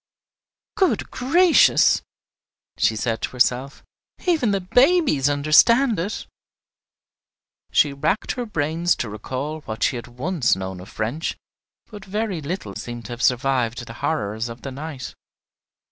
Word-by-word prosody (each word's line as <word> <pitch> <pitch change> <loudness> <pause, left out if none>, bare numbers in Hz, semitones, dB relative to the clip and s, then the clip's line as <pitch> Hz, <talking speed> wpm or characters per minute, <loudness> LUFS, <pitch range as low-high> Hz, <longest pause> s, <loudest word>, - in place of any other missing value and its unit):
"Good 380 - +1
gracious!" 330 +7 +4 0.7
she 110 - +2
said 115 +1 -2
to - - -2
herself, 125 +2 0 0.4
"even 320 - +2
the 200 -1 +1
babies 245 - +3
understand 180 - +4
it!" 200 +6 -3 1.5
She 145 -2 +3
racked 155 +9 -1
her 245 -2 -4
brains 165 -1 0
to 120 - -4
recall 130 +9 -5
what 110 +1 -4
she 125 - +1
had 120 - -8
once 130 - 0
known 95 -1 -6
of 90 - -11
French, 120 +9 -3 0.5
but 205 -2 -9
very 200 -3 -3
little 145 - -5
seemed 120 +3 -7
to - - -8
have 120 0 -6
survived 125 -2 +1
the 115 - -9
horrors 110 -7 -2
of 115 +1 -10
the 135 - -5
night! 140 -1 -7
145 Hz, 135 wpm, -22 LUFS, 120-195 Hz, 1.5 s, gracious